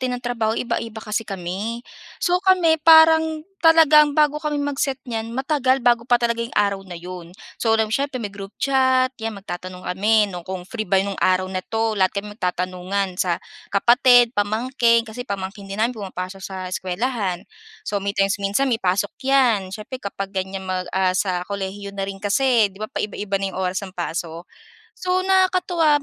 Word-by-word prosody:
din 255 Hz, -1 st, -1 dB
ng 245 Hz, -, -10 dB
trabaho 230 Hz, -2 st, -1 dB
iba-iba 230 Hz, -2 st, -3 dB
kasi 215 Hz, 0 st, -3 dB
kami. 195 Hz, +5 st, -4 dB, 0.4 s
So, 355 Hz, 0 st, +3 dB
kami 365 Hz, -4 st, +4 dB
parang 320 Hz, -1 st, +6 dB, 0.2 s
talagang 310 Hz, -3 st, +6 dB
bago 300 Hz, -1 st, +3 dB
kami 300 Hz, -1 st, -2 dB
mag-set 285 Hz, -1 st, -1 dB
niyan 225 Hz, -2 st, -4 dB
matagal 265 Hz, -2 st, +1 dB
bago 240 Hz, -1 st, +3 dB
pa 245 Hz, -, +5 dB
talaga 235 Hz, -1 st, -1 dB
'yong 230 Hz, +1 st, -5 dB
araw 200 Hz, -1 st, +2 dB
na 175 Hz, -, -7 dB
'yon. 175 Hz, 0 st, -9 dB, 0.3 s
So 225 Hz, -1 st, +3 dB
'lam 220 Hz, -1 st, 0 dB
mo, -, -, -5 dB
siyempre 275 Hz, 0 st, -1 dB
may-group 200 Hz, -1 st, -7 dB
chat, 260 Hz, -1 st, +2 dB
'yan 225 Hz, -1 st, -3 dB
magtatanong 185 Hz, -1 st, -7 dB
kami 210 Hz, +4 st, +2 dB
no'ng 175 Hz, -2 st, -8 dB
kung 185 Hz, -1 st, -4 dB
free 215 Hz, +3 st, -5 dB
ba 195 Hz, -, +3 dB
nung 200 Hz, -1 st, -5 dB
araw 185 Hz, 0 st, +3 dB
na 185 Hz, -, -1 dB
'to? 225 Hz, +3 st, -1 dB
Lahat 185 Hz, -1 st, +2 dB
kami 205 Hz, +1 st, -4 dB
magtatanungan, 185 Hz, +1 st, -2 dB
sa 175 Hz, -2 st, +1 dB, 0.3 s
kapatid, 245 Hz, +3 st, +5 dB
pamangkin, 230 Hz, +3 st, +2 dB
kasi 245 Hz, +3 st, -8 dB
pamangkin 195 Hz, +1 st, -5 dB
din 195 Hz, -, -5 dB
namin 240 Hz, +2 st, +1 dB
pumapasok 190 Hz, 0 st, -6 dB
sa 190 Hz, 0 st, -7 dB, 0.2 s
eskuwelahan. 190 Hz, -1 st, -2 dB, 0.4 s
So 205 Hz, -, -1 dB
may 200 Hz, +1 st, -3 dB
times 195 Hz, +1 st, +2 dB
minsan 205 Hz, +7 st, +1 dB
may 225 Hz, -, +1 dB
pasok 190 Hz, +2 st, 0 dB
'yan, 245 Hz, -8 st, +3 dB
siyempre 235 Hz, +4 st, -7 dB
kapag 195 Hz, -1 st, -5 dB
ganyan 190 Hz, 0 st, -4 dB
mag 185 Hz, -1 st, -3 dB
ah, 185 Hz, -1 st, +2 dB
sa 180 Hz, -2 st, 0 dB
kolehiyo 200 Hz, 0 st, -5 dB
na 195 Hz, -1 st, -3 dB
rin 195 Hz, -, -5 dB
kasi 225 Hz, 0 st, +3 dB
'di 195 Hz, -, -17 dB
ba 215 Hz, -, -2 dB
paiba-iba 205 Hz, -1 st, -3 dB
na -, -, +1 dB
yung -, -, -6 dB
oras 185 Hz, +2 st, -1 dB
ng 190 Hz, -, -9 dB
pasok. 170 Hz, -1 st, -5 dB, 0.5 s
So 370 Hz, 0 st, 0 dB
nakakatuwa 365 Hz, -5 st, +2 dB
215 Hz, 180 wpm, -22 LUFS, 190-260 Hz, 0.5 s, parang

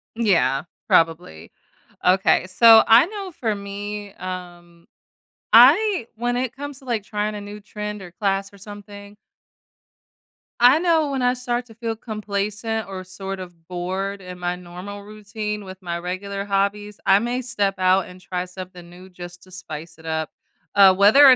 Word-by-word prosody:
Yeah. 180 Hz, -, +2 dB, 0.3 s
Probably. 160 Hz, -, +1 dB, 0.5 s
Okay, 185 Hz, 0 st, +3 dB
so 225 Hz, +4 st, +8 dB
I 230 Hz, +6 st, +7 dB
know 400 Hz, -1 st, -6 dB
for 225 Hz, -8 st, -2 dB
me, 205 Hz, 0 st, -6 dB
um, 175 Hz, -2 st, -9 dB, 0.7 s
I 285 Hz, -, +6 dB
when 240 Hz, +2 st, -1 dB
it 255 Hz, 0 st, -2 dB
comes 285 Hz, 0 st, -7 dB
to, 270 Hz, -, -18 dB
like, 235 Hz, -5 st, -1 dB
trying 210 Hz, 0 st, -3 dB
a 205 Hz, -, -6 dB
new 205 Hz, +1 st, -9 dB
trend 210 Hz, 0 st, -6 dB
or 180 Hz, -2 st, -10 dB
class 195 Hz, +1 st, -1 dB
or -, -, -14 dB
something 205 Hz, 0 st, -11 dB, 1.4 s
I 250 Hz, +5 st, +6 dB
know 325 Hz, -4 st, +2 dB
when 270 Hz, -2 st, -2 dB
I 250 Hz, 0 st, +2 dB
start 245 Hz, -1 st, -3 dB
to 225 Hz, -, -15 dB
feel 230 Hz, 0 st, -3 dB
complacent 215 Hz, 0 st, -3 dB
or 190 Hz, -1 st, -6 dB
sort 190 Hz, +1 st, -7 dB
of 175 Hz, -3 st, -11 dB
bored 190 Hz, +3 st, -4 dB
in 180 Hz, -1 st, -9 dB
my 175 Hz, 0 st, -1 dB
normal 180 Hz, +3 st, -9 dB
routine 210 Hz, 0 st, -6 dB
with 190 Hz, -1 st, -9 dB
my 170 Hz, -1 st, -3 dB
regular 195 Hz, +3 st, -4 dB
hobbies, 205 Hz, +1 st, -1 dB
I 195 Hz, +1 st, +6 dB
may 240 Hz, +3 st, -2 dB
step 205 Hz, -5 st, -1 dB
out 185 Hz, +1 st, +3 dB
and 180 Hz, 0 st, -13 dB
try 180 Hz, -1 st, -4 dB
something 180 Hz, -1 st, -10 dB
new 180 Hz, +2 st, -13 dB
just 175 Hz, -1 st, -11 dB
to 185 Hz, -, -18 dB
spice 165 Hz, -4 st, -9 dB
it 160 Hz, -, -15 dB
up. 160 Hz, -1 st, -2 dB, 0.4 s
Uh, 195 Hz, -2 st, +7 dB
whether 205 Hz, +9 st, +7 dB
or 265 Hz, -2 st, +9 dB
200 Hz, 165 wpm, -22 LUFS, 185-225 Hz, 1.4 s, or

